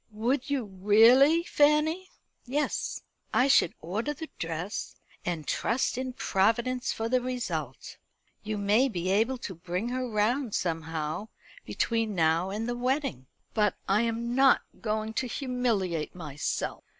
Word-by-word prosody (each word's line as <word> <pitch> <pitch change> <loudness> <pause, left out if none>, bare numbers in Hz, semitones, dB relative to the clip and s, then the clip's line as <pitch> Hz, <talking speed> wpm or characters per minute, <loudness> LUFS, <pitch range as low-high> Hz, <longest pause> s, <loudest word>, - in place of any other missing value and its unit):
"Would 240 +6 -1
you 275 -5 0
really, 225 - +5
Fanny?" 310 +4 +2 0.4
"Yes; 290 +4 -2 0.3
I 255 - +5
should 270 -11 +4
order 220 - -3
the 320 +2 -7
dress, 165 +5 -4 0.3
and 170 -4 -3
trust 235 +4 0
in 255 0 -3
Providence 240 +4 +1
for 225 - -2
the 250 +1 +2
result. 250 -1 -4 0.4
You 215 0 -3
may 210 +7 +3
be 185 -4 -2
able 225 +6 +2
to 205 - -6
bring 180 +6 -3
her 255 0 -2
round 225 +3 0
somehow 160 +2 -2 0.4
between 225 -3 -1
now 165 +2 +2
and 215 +4 -3
the 240 - -2
wedding." 250 - -1 0.3
"But 210 -3 +2
I 200 +3 +3
am 235 +1 -1
not 270 +1 +5 0.2
going 220 -1 -2
to 255 +3 -1
humiliate 230 - -1
myself. 150 -4 -3
225 Hz, 140 wpm, -28 LUFS, 190-255 Hz, 0.4 s, really